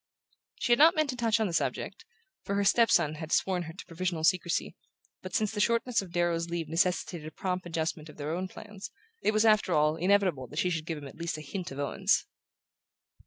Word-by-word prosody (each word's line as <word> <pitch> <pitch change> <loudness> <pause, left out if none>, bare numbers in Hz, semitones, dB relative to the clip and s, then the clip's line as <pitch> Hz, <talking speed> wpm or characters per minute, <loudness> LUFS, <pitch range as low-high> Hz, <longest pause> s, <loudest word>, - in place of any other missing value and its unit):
She - - -2
had 240 - +5
not 320 +3 +7
meant 310 -3 +1
to - - -6
touch 230 -2 +1
on 220 - +2
the 180 - -3
subject, 165 - -2 0.4
for 200 - -2
her 200 - +2
step 230 +4 +4
son 155 -3 +3
had 160 +1 -6
sworn 185 -2 +2
her - - -8
to 185 - -10
provisional 170 -1 -3
secrecy; 175 +1 +1 0.5
but 185 - -6
since 215 -2 +1
the 215 - -4
shortness 230 +1 +2
of 190 -3 -10
Darrow's 170 -1 0
leave 170 -1 -3
necessitated 170 -1 0
a - - -7
prompt 180 +2 -3
adjustment 160 -1 -3
of 150 - -13
their 150 +1 -3
own 185 +2 -2
plans, 210 0 -9 0.3
it - - +2
was, 215 +1 +2
after 215 -4 +4
all, 150 +1 +3
inevitable 180 -7 +2
that 150 - -11
she 180 +2 +1
should 160 -1 -3
give 165 - -3
him 145 -1 -8
at - - -13
least 170 -2 -3
a - - -7
hint 175 +5 -5
of 135 - -8
Owen's. 140 -1 +1
180 Hz, 225 wpm, -29 LUFS, 160-205 Hz, 0.5 s, not